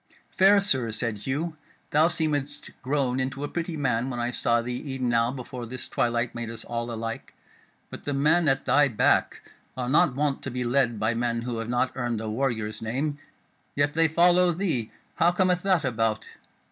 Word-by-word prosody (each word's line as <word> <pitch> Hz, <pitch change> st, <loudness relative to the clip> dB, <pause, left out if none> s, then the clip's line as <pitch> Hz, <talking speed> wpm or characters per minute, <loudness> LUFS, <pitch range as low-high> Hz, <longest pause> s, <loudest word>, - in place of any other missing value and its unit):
"Fair 195 Hz, +2 st, +5 dB
Sir," 130 Hz, -, +1 dB
said 110 Hz, -1 st, -3 dB
Hugh, 155 Hz, +4 st, -2 dB, 0.3 s
"thou 155 Hz, +2 st, +5 dB
seemedst 145 Hz, -3 st, -2 dB
grown 130 Hz, -2 st, 0 dB
into 135 Hz, +2 st, -3 dB
a -, -, -1 dB
pretty 170 Hz, +1 st, -4 dB
man 125 Hz, -3 st, 0 dB
when 120 Hz, -2 st, -4 dB
I 120 Hz, +1 st, -1 dB
saw 120 Hz, -1 st, +2 dB
thee 125 Hz, +1 st, -4 dB
e'en 130 Hz, -1 st, -1 dB
now 115 Hz, 0 st, +2 dB
before 125 Hz, -2 st, -7 dB
this 120 Hz, 0 st, -5 dB
twilight 120 Hz, 0 st, 0 dB
made 120 Hz, -1 st, -5 dB
us 115 Hz, 0 st, -7 dB
all 120 Hz, 0 st, -3 dB
alike; 115 Hz, 0 st, -5 dB, 0.6 s
but -, -, -9 dB
the 145 Hz, -, -1 dB
men 155 Hz, +4 st, +3 dB
at 135 Hz, -1 st, +1 dB
thy 145 Hz, +3 st, +4 dB
back 115 Hz, -6 st, +1 dB, 0.3 s
are 125 Hz, -1 st, -2 dB
not 150 Hz, -2 st, +3 dB
wont 145 Hz, 0 st, 0 dB
to -, -, -5 dB
be 125 Hz, 0 st, -3 dB
led 120 Hz, -2 st, +1 dB
by 110 Hz, +1 st, +1 dB
men 115 Hz, 0 st, -1 dB
who 120 Hz, -2 st, -3 dB
have 115 Hz, +1 st, -4 dB
not 125 Hz, +1 st, +1 dB
earned 120 Hz, -3 st, -2 dB
a 110 Hz, -1 st, -4 dB
warrior's 110 Hz, -3 st, -2 dB
name, 140 Hz, +6 st, -2 dB, 0.6 s
yet 145 Hz, +1 st, +1 dB
they 165 Hz, 0 st, +4 dB
follow 175 Hz, +2 st, +4 dB
thee: 160 Hz, -, -2 dB, 0.3 s
how 170 Hz, -, +4 dB
cometh 180 Hz, 0 st, +1 dB
that 185 Hz, -6 st, +2 dB
about? 115 Hz, -3 st, 0 dB
130 Hz, 190 wpm, -26 LUFS, 115-150 Hz, 0.6 s, Fair